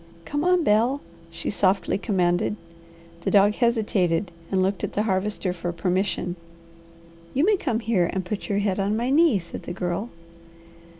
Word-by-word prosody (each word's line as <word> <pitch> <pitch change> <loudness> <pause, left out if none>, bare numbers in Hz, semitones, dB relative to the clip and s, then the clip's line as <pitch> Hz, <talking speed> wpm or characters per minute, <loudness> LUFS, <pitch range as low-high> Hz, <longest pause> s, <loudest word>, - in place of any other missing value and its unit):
"Come 290 +1 -2
on, 360 -1 +3
Bel," 235 +4 +3 0.3
she 165 0 -4
softly 195 0 +1
commanded. 180 -2 +1 0.7
The - - 0
dog 205 +1 +5
hesitated, 205 -7 +1 0.2
and 190 -1 +2
looked 195 0 -1
at - - -3
the 210 - +1
Harvester 195 -2 -1
for 175 0 -4
permission. 180 +1 -1 1.0
"You 280 +5 +3
may 420 +1 +4
come 250 - -1
here 195 -7 +1
and 190 -1 -3
put 205 +2 -4
your 200 - +1
head 200 -1 0
on 200 +2 +1
my 240 +3 0
knee," 310 -5 +5
said 170 -2 -7
the - - -6
Girl. 180 +5 -3
200 Hz, 165 wpm, -24 LUFS, 185-230 Hz, 1.0 s, dog